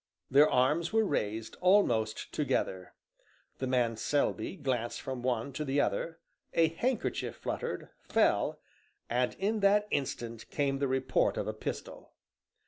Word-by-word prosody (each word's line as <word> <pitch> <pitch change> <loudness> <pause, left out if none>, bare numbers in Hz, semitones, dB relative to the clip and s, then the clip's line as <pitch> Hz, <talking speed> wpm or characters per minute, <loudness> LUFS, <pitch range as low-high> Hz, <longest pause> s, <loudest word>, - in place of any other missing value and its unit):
Their 145 +3 +7
arms 150 +7 +2
were 220 0 +3
raised 110 - -2
almost 120 - +3
together. 90 -1 -1 0.6
The 130 - -1
man 120 -3 +1
Selby 145 - 0
glanced 125 -8 -2
from 130 -2 -5
one 125 +1 -1
to 145 +4 -3
the 140 0 0
other, 145 +7 0 0.4
a 165 -1 +5
handkerchief 235 +9 -1
fluttered, - - -4 0.2
fell, - - +2 0.5
and 125 +1 +1
in 210 +3 0
that 205 +1 +4
instant 120 -4 -3
came 140 -2 0
the 140 - +1
report 130 0 +1
of - - -1
a - - -1
pistol. - - -6
135 Hz, 135 wpm, -31 LUFS, 120-165 Hz, 0.6 s, Their